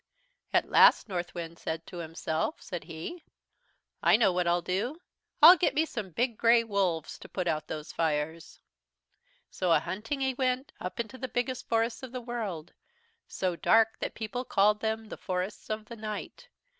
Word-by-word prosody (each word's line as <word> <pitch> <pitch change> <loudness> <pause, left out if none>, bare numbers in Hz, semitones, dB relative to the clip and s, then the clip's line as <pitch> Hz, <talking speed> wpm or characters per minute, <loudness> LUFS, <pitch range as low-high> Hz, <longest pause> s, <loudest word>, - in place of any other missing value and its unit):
"At - - +2
last - - +6
Northwind 175 -3 -5
said 160 +1 -4
to 180 - -9
himself, 165 - -3
said 175 -4 -6
he: 165 - -7 0.8
"'I - - +6
know 215 -5 +3
what 180 -1 0
I'll 175 0 +2
do, 210 - -2 0.4
I'll 345 +4 +12
get 340 - +1
me 315 +2 +3
some 215 -10 -5
big 235 +6 -1
grey 230 0 +5
wolves 195 -7 -1
to - - -12
put 185 -2 -3
out 155 -2 -1
those 155 -1 -6
fires.' 160 0 -2 0.9
"So 180 -2 0
a 165 - +6
hunting 210 - -4
he 265 0 +1
went, 255 +1 -1
up 180 - -6
into 235 +3 -4
the 260 - -3
biggest 245 +1 -3
forests 230 0 +1
of 260 -2 -8
the 255 - -3
world, 210 -9 -5 0.5
so 185 -2 -2
dark 225 +5 +4
that - - -4
people 225 +3 -4
called 210 -2 +3
them 220 0 -2
'the 215 - -8
Forests 185 +1 -4
of 215 0 -4
Night.' 215 - -6
210 Hz, 170 wpm, -29 LUFS, 175-240 Hz, 0.9 s, I'll